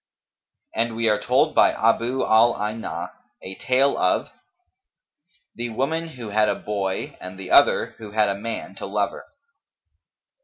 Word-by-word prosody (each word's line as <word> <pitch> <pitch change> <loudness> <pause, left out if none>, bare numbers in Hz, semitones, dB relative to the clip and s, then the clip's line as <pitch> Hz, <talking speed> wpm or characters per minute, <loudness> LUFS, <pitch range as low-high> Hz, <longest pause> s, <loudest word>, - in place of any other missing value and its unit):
[FN#254] 110 - +1
And 115 -1 -6
we 115 0 +1
are 105 - +1
told - - +2
by - - +5
Abu 115 +3 +1
al 115 +2 +4
Aynα[FN#255] 105 -5 -4 0.3
a 95 +1 -7
tale 135 +2 +2
of - - +1 1.2
THE 120 0 -5
WOMAN 155 +8 -2
WHO 125 -8 -9
HAD 105 +1 +2
A - - +1
BOY 100 -2 -3
AND 90 +1 -8
THE 95 -1 -8
OTHER - - +4
WHO 110 -2 -8
HAD 105 0 +2
A - - +1
MAN 105 -2 -6
TO 100 - -7
LOVER. 100 +1 -2
110 Hz, 155 wpm, -23 LUFS, 100-120 Hz, 1.2 s, by